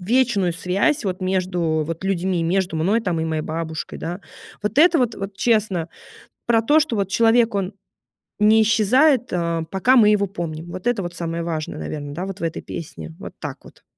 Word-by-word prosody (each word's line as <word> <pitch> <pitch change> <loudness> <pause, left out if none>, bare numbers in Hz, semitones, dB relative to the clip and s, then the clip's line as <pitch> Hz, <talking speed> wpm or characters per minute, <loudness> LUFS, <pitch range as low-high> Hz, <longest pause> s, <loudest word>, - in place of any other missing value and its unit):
вечную 210 -3 +2
связь 195 - 0
вот 185 0 -2
между 180 -4 0
вот 165 +1 -5
людьми, 185 -2 0
между 180 0 0
мной 195 +9 +2
там 180 -7 -1
и 160 - -1
моей 160 -1 -2
бабушкой, 160 0 -5
да. 175 +4 -5 0.4
Вот 210 +3 -3
это 335 +1 +6
вот 240 -3 +1
вот 195 -1 -6
честно, 205 -8 +1 0.6
про 230 -1 +3
то, 300 +7 +4
что 295 -7 0
вот 200 -2 0
человек, 230 +2 +3
он 195 0 -2 0.7
не 220 +1 +6
исчезает, 250 +5 +3
э, 170 -2 -1
пока 195 +7 +3
мы 225 -5 +6
его 205 -1 +3
помним. 170 -3 -6
Вот 185 +5 -3
это 235 -5 0
вот 175 -1 -6
самое 170 -1 -3
важное, 160 -2 -4
наверно, 145 - -5
да, 180 +5 -4
вот 195 0 -7
в - - -8
этой 165 -1 -3
песне. 80 - -8
Вот - - -8
так - - -6
вот. - - -17
190 Hz, 195 wpm, -22 LUFS, 165-220 Hz, 0.7 s, это